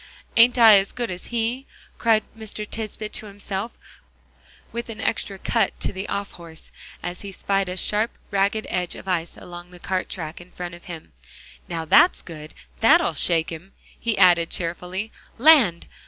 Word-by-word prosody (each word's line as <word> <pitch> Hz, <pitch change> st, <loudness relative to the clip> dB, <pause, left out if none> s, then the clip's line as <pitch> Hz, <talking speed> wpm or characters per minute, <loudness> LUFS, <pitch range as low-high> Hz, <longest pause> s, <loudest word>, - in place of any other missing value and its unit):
"Ain't 240 Hz, +2 st, +6 dB
I 220 Hz, -4 st, +9 dB
as 195 Hz, -, -3 dB
good 240 Hz, -5 st, -3 dB
as 180 Hz, 0 st, -7 dB
he?" 240 Hz, +3 st, -2 dB, 0.3 s
cried 225 Hz, -2 st, +3 dB
Mr. 215 Hz, -1 st, -6 dB
Tisbett 215 Hz, -1 st, -4 dB
to 215 Hz, -, -6 dB
himself, 200 Hz, +2 st, -5 dB, 0.9 s
with 235 Hz, +1 st, -5 dB
an 220 Hz, -1 st, -7 dB
extra 205 Hz, -3 st, -1 dB
cut -, -, 0 dB
to -, -, -2 dB
the 190 Hz, +1 st, -5 dB
off 200 Hz, 0 st, -3 dB
horse, 165 Hz, -2 st, -12 dB, 0.3 s
as 175 Hz, +1 st, -5 dB
he 200 Hz, -, -7 dB
spied 195 Hz, 0 st, -1 dB
a 180 Hz, -, -5 dB
sharp 215 Hz, +4 st, +1 dB, 0.2 s
ragged 200 Hz, +2 st, +1 dB
edge 180 Hz, -1 st, -2 dB
of -, -, -11 dB
ice 175 Hz, -2 st, -2 dB
along 175 Hz, 0 st, -10 dB
the 180 Hz, -, -13 dB
cart 185 Hz, +1 st, -3 dB
track 165 Hz, -2 st, -6 dB
in 175 Hz, -, -14 dB
front 180 Hz, -1 st, -7 dB
of 175 Hz, -, -13 dB
him. 165 Hz, -3 st, -9 dB, 0.6 s
"Now 165 Hz, -2 st, -3 dB
that's 350 Hz, -, +5 dB
good; 155 Hz, -3 st, -10 dB, 0.2 s
that'll -, -, +5 dB
shake 165 Hz, -2 st, +1 dB
him," 170 Hz, +4 st, -9 dB, 0.3 s
he 230 Hz, -3 st, -1 dB
added 175 Hz, -3 st, +5 dB
cheerfully. 180 Hz, +5 st, -3 dB, 0.3 s
"Land! 240 Hz, -, +6 dB
195 Hz, 170 wpm, -23 LUFS, 175-220 Hz, 0.9 s, I